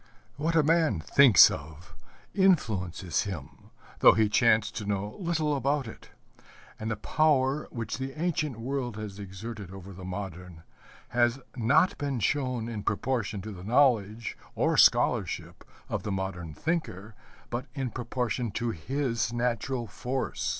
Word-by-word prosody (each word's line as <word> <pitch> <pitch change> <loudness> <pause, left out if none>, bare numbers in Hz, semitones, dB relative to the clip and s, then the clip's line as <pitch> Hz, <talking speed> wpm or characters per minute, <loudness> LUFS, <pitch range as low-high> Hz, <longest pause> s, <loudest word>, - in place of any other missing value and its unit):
What 160 +4 -1
a 160 - +5
man 160 - +2
thinks 125 - +7
of 80 +4 -9 0.4
influences 105 - +1
him, 90 -9 -8 0.3
though - - +8
he 110 -1 +2
chance 110 -1 +3
to 105 - -6
know 105 +1 -2
little 160 -5 0
about 140 0 0
it; 110 - -11 0.7
and 110 - -3
the 110 - -1
power 145 +3 +1
which 115 0 -5
the 135 +3 -5
ancient 155 -7 -1
world 125 -2 -3
has 105 -2 -7
exerted 100 +1 -7
over 95 0 -10
the 95 +1 -10
modern 90 -3 -7 0.5
has 120 +1 +2 0.2
not 135 +9 +3
been 140 -4 -2
shown 125 0 0
in 110 -3 -4
proportion 105 -2 -2
to 110 - -6
the 90 -3 -9
knowledge 115 -2 +2 0.2
or - - +1
scholarship - - +3 0.2
of - - -3
the 105 - -4
modern 95 -5 -4
thinker, 145 - -3 0.4
but 125 +4 -3
in 135 -4 -2
proportion 120 -1 -2
to 120 +2 -1
his 115 - -2
natural 120 +1 -1
force. 125 +5 -3
115 Hz, 145 wpm, -28 LUFS, 100-135 Hz, 0.7 s, though